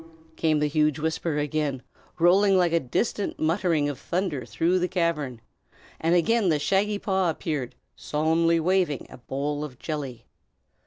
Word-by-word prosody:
_" -, -, -28 dB
came 160 Hz, -2 st, +2 dB
the 150 Hz, -, +1 dB
huge 150 Hz, 0 st, +2 dB
whisper 160 Hz, 0 st, -2 dB
again, 145 Hz, -3 st, -1 dB, 0.3 s
rolling 190 Hz, +3 st, +5 dB
like 175 Hz, -2 st, +2 dB
a 170 Hz, -, +4 dB
distant 195 Hz, -, -2 dB
muttering 165 Hz, -2 st, +1 dB
of 145 Hz, -2 st, -4 dB
thunder 170 Hz, -8 st, -2 dB
through 165 Hz, +11 st, +1 dB
the 180 Hz, -, 0 dB
cavern; 160 Hz, -, -1 dB, 0.6 s
and 165 Hz, +2 st, +2 dB
again 200 Hz, +3 st, +3 dB
the 155 Hz, -, +3 dB
shaggy 195 Hz, +7 st, +1 dB
paw 190 Hz, -3 st, 0 dB
appeared, 150 Hz, -5 st, -3 dB, 0.2 s
solemnly 165 Hz, +2 st, +1 dB
waving 175 Hz, -4 st, +1 dB
a -, -, -10 dB
bowl 145 Hz, +4 st, -3 dB
of 135 Hz, -5 st, -8 dB
jelly. 140 Hz, -6 st, -5 dB
160 Hz, 155 wpm, -26 LUFS, 145-180 Hz, 0.6 s, rolling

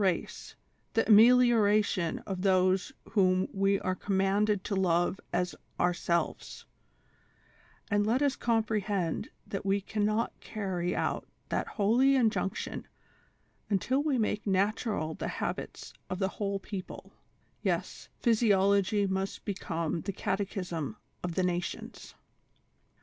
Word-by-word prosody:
race, 185 Hz, -4 st, -1 dB, 0.4 s
the 225 Hz, -, +2 dB
amelioration 215 Hz, -5 st, +5 dB
of 190 Hz, -3 st, -4 dB
those 185 Hz, +2 st, +2 dB, 0.2 s
whom 185 Hz, -2 st, +3 dB
we 195 Hz, 0 st, +2 dB
are 185 Hz, -, 0 dB
commanded 195 Hz, +1 st, +1 dB
to -, -, -3 dB
love 175 Hz, 0 st, +1 dB
as 180 Hz, 0 st, 0 dB, 0.3 s
ourselves; 175 Hz, -1 st, -1 dB, 1.3 s
and 205 Hz, 0 st, +3 dB
let 235 Hz, +4 st, +2 dB
us 285 Hz, -2 st, +2 dB
comprehend 210 Hz, -6 st, 0 dB, 0.2 s
that 195 Hz, -, -4 dB
we 195 Hz, 0 st, +2 dB
can 205 Hz, +2 st, -3 dB
not 215 Hz, +2 st, +1 dB
carry 185 Hz, -5 st, -3 dB
out -, -, -1 dB, 0.2 s
that -, -, -1 dB
holy 240 Hz, +7 st, +3 dB
injunction 225 Hz, -6 st, -1 dB, 0.8 s
until 240 Hz, +7 st, +1 dB
we 290 Hz, -3 st, +1 dB
make 215 Hz, -2 st, -1 dB
natural 195 Hz, -4 st, 0 dB
the -, -, -4 dB
habits -, -, -4 dB, 0.2 s
of 185 Hz, -, -2 dB
the 190 Hz, 0 st, 0 dB
whole 200 Hz, 0 st, -2 dB
people; 195 Hz, -1 st, -8 dB, 0.5 s
yes, -, -, -2 dB
physiology 200 Hz, -3 st, +3 dB
must 190 Hz, 0 st, -3 dB
be 200 Hz, -, -1 dB
come 165 Hz, -3 st, -3 dB
the 200 Hz, -, -3 dB
catechism 190 Hz, -3 st, -3 dB, 0.2 s
of 175 Hz, -2 st, -4 dB
the 185 Hz, -, +1 dB
nations. 175 Hz, -1 st, -4 dB
195 Hz, 120 wpm, -30 LUFS, 185-215 Hz, 1.3 s, amelioration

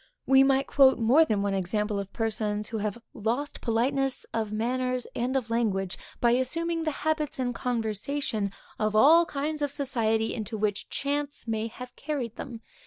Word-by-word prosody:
We 270 Hz, 0 st, +6 dB
might 270 Hz, 0 st, +4 dB
quote 270 Hz, -2 st, +5 dB
more 250 Hz, +8 st, +5 dB
than 210 Hz, -7 st, 0 dB
one 200 Hz, -1 st, 0 dB
example 205 Hz, +2 st, -1 dB
of 195 Hz, -1 st, -6 dB
persons, 215 Hz, -2 st, -2 dB
who 220 Hz, -, -3 dB
have 210 Hz, +1 st, -2 dB, 0.2 s
lost 240 Hz, +7 st, -2 dB
politeness 265 Hz, +3 st, 0 dB
of 220 Hz, -2 st, -1 dB
manners 250 Hz, +3 st, -1 dB
and 250 Hz, +3 st, -1 dB
of 230 Hz, -3 st, -3 dB
language 195 Hz, -5 st, 0 dB, 0.2 s
by 235 Hz, -, +4 dB
assuming 330 Hz, +7 st, 0 dB
the 310 Hz, -1 st, -3 dB
habits 310 Hz, -2 st, 0 dB
and 250 Hz, -2 st, -1 dB
conversation 225 Hz, -1 st, -2 dB, 0.3 s
of 215 Hz, 0 st, 0 dB
all 320 Hz, +9 st, +7 dB
kinds 300 Hz, +2 st, -3 dB
of 290 Hz, -, +1 dB
society 230 Hz, -6 st, 0 dB
into 220 Hz, -1 st, -4 dB
which 205 Hz, -1 st, -1 dB
chance 285 Hz, -2 st, -2 dB
may 220 Hz, 0 st, -1 dB
have 250 Hz, +2 st, -10 dB
carried 275 Hz, -7 st, -4 dB
them. 230 Hz, -2 st, -7 dB
240 Hz, 170 wpm, -27 LUFS, 215-275 Hz, 0.3 s, all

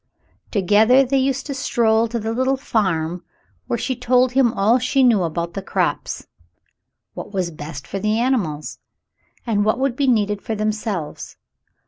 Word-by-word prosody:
Together 215 Hz, +6 st, +4 dB
they 270 Hz, +2 st, +1 dB
used 265 Hz, 0 st, 0 dB
to 285 Hz, -, -4 dB
stroll 235 Hz, -4 st, +1 dB
to 235 Hz, +1 st, -3 dB
the 225 Hz, 0 st, -3 dB
little 260 Hz, +3 st, +1 dB
farm, 180 Hz, -9 st, -1 dB, 0.4 s
where 235 Hz, -, -1 dB
she 260 Hz, +3 st, -2 dB
told 250 Hz, +1 st, +2 dB
him 255 Hz, -2 st, +3 dB
all 220 Hz, +6 st, +3 dB
she 260 Hz, +2 st, +2 dB
knew 230 Hz, -6 st, +4 dB
about 170 Hz, 0 st, -3 dB
the 195 Hz, -, -4 dB
crops 190 Hz, -, -2 dB, 0.4 s
— -, -, -55 dB
what -, -, -8 dB
was 185 Hz, -4 st, -2 dB
best 150 Hz, -2 st, -8 dB
for 195 Hz, -, -5 dB
the 215 Hz, +2 st, 0 dB
animals, 200 Hz, -, -1 dB, 0.7 s
and 210 Hz, -4 st, +1 dB
what 215 Hz, +1 st, +1 dB
would 265 Hz, -1 st, 0 dB
be 275 Hz, +1 st, 0 dB
needed 210 Hz, -4 st, +1 dB
for 220 Hz, -, -3 dB
themselves. 215 Hz, -6 st, -3 dB
220 Hz, 165 wpm, -21 LUFS, 195-255 Hz, 0.7 s, Together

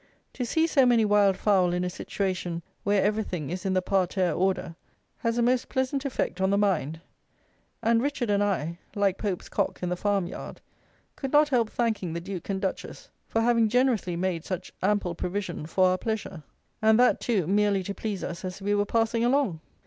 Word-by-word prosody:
To 250 Hz, -, -3 dB
see 320 Hz, +7 st, +2 dB
so 285 Hz, -5 st, +4 dB
many 240 Hz, -3 st, +4 dB
wild 205 Hz, -2 st, +4 dB
fowl 190 Hz, -4 st, +3 dB
in 180 Hz, 0 st, 0 dB
a 180 Hz, -, -1 dB
situation 180 Hz, -3 st, -3 dB, 0.2 s
where 205 Hz, -1 st, +2 dB
everything 195 Hz, -7 st, -1 dB
is 185 Hz, +2 st, -3 dB
in 190 Hz, -, 0 dB
the 185 Hz, -, +1 dB
parterre 185 Hz, -1 st, +1 dB
order 185 Hz, -2 st, -1 dB, 0.4 s
has 230 Hz, -1 st, -1 dB
a 240 Hz, -, +2 dB
most 250 Hz, +1 st, +1 dB
pleasant 265 Hz, +2 st, -1 dB
effect 235 Hz, -8 st, -2 dB
on 190 Hz, -, +3 dB
the 200 Hz, -, +2 dB
mind; 165 Hz, -6 st, 0 dB, 0.8 s
and 230 Hz, +1 st, +3 dB
Richard 270 Hz, -5 st, -1 dB
and 205 Hz, 0 st, +3 dB
I, 170 Hz, -4 st, -1 dB, 0.2 s
like 200 Hz, -2 st, +1 dB
Pope's 195 Hz, -4 st, -3 dB
cock 200 Hz, -2 st, -2 dB
in 180 Hz, -, 0 dB
the 180 Hz, -, 0 dB
farmyard, 195 Hz, -1 st, -2 dB, 0.6 s
could 270 Hz, -2 st, -5 dB
not 300 Hz, 0 st, +5 dB
help 235 Hz, -5 st, +2 dB
thanking 220 Hz, -9 st, -1 dB
the 170 Hz, -, -2 dB
Duke 185 Hz, +1 st, -7 dB
and 195 Hz, -1 st, -1 dB
Duchess 190 Hz, -1 st, -5 dB, 0.2 s
for 225 Hz, -, 0 dB
having 230 Hz, -1 st, +3 dB
generously 245 Hz, -7 st, +1 dB
made 175 Hz, -2 st, -1 dB
such 185 Hz, -1 st, -5 dB
ample 195 Hz, -2 st, +1 dB
provision 180 Hz, -2 st, -4 dB
for 185 Hz, +2 st, +3 dB
our 185 Hz, 0 st, 0 dB
pleasure, 215 Hz, -6 st, -4 dB, 0.4 s
and 220 Hz, +1 st, +5 dB
that, 250 Hz, -, +4 dB
too, 210 Hz, -8 st, +1 dB
merely 200 Hz, +1 st, +2 dB
to 200 Hz, -, -4 dB
please 205 Hz, -2 st, -4 dB
us 170 Hz, +1 st, -5 dB
as 185 Hz, +1 st, -5 dB
we 205 Hz, +1 st, 0 dB
were 205 Hz, 0 st, +1 dB
passing 230 Hz, +1 st, +1 dB
along. 245 Hz, -, +2 dB
200 Hz, 195 wpm, -27 LUFS, 185-230 Hz, 0.8 s, not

